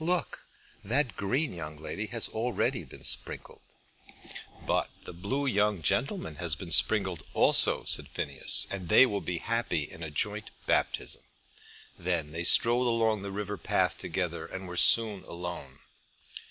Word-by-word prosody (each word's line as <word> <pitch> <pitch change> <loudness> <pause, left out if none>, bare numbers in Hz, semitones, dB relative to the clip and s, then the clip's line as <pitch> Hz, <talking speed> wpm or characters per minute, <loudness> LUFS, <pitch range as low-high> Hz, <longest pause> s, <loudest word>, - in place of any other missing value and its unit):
Look. 175 +1 -1 0.4
That 125 +5 0
green 130 +9 -1
young 75 -3 -7
lady 100 +7 -5
has 115 0 +1
already 115 0 -1
been - - -14
sprinkled." - - +2 1.0
"But - - 0 0.2
the - - -8
blue 100 +12 -2
young 105 - +1
gentleman 75 +1 -1
has 85 -4 -1
been 85 +2 -9
sprinkled 95 0 +3
also," - - +4
said - - +1
Phineas, 70 -1 +1
"and 90 -4 -5
they 130 - +8
will 100 -5 -2
be 90 - -3
happy 115 -7 -1
in 80 - -9
a 80 - -4
joint 75 - -3 0.2
baptism." - - 0 0.8
Then 85 -4 -2
they 85 +2 -4
strolled 120 +6 +5
along 115 -3 +1
the 100 - -6
river 100 +1 -4
path - - 0
together, - - -3
and 95 0 -7
were 90 - -7
soon 105 +1 +4
alone. 85 -6 -7
100 Hz, 150 wpm, -29 LUFS, 85-115 Hz, 1.0 s, they